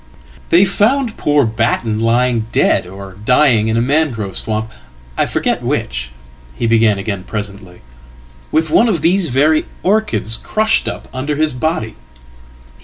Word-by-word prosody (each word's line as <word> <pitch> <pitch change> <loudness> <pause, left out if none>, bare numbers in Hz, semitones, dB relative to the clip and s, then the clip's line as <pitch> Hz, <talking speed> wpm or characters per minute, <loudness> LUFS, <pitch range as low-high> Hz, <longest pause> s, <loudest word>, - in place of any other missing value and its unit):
""They 180 +4 +5
found 225 +5 +1
poor 145 -2 +2
Batten 110 0 -1
lying 115 0 +1
dead, - - +2
or 95 0 -10
dying, 125 -3 +3
in 110 0 0
a 115 - +2
mangrove 125 - -1
swamp 110 0 -3 0.4
Iforget - - -1
which," 60 0 -2 0.5
he - - -3
began 115 -2 +3
again 100 -1 -4
presently, 100 -4 -7 0.7
"with 160 -1 +1
one 235 - +4
of 175 -7 0
these 175 0 +2
very 150 +5 +2 0.2
orchidscrushed 215 - +1
up - - -5
under 140 +3 -2
his 155 -1 0
body. 125 -5 -2
120 Hz, 130 wpm, -16 LUFS, 110-160 Hz, 0.7 s, They